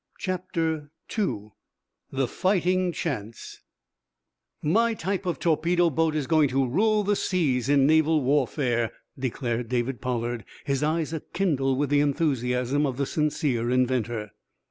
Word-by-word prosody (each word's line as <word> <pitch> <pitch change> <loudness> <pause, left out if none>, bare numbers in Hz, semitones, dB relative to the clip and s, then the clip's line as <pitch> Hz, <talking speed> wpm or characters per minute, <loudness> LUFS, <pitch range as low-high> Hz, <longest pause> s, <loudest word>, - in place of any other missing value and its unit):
CHAPTER 165 -5 -2 0.3
II 110 - -2 0.6
THE 135 -1 -1
FIGHTING 185 - +1
CHANCE 115 -10 -5 1.0
"My 225 +9 +2
type 195 0 -3
of 175 - -1
torpedo 170 +1 +2
boat 160 +2 +1
is 150 -3 0
going 155 -1 +3
to 135 0 +1
rule 210 - +2
the 205 +1 +1
seas 140 - 0
in 140 -2 +5
naval 160 0 +4
warfare," 125 -4 +1 0.3
declared 120 -2 -2
David 125 0 -1
Pollard, 120 -2 -2 0.2
his 140 -2 0
eyes 155 +1 0
a 160 - -2
kindle 140 -8 0
with 145 +1 -1
the 145 - +4
enthusiasm 135 -2 +1
of 130 -2 -4
the 140 - 0
sincere 145 -6 0
inventor. 120 -4 0
145 Hz, 135 wpm, -26 LUFS, 125-165 Hz, 1.0 s, in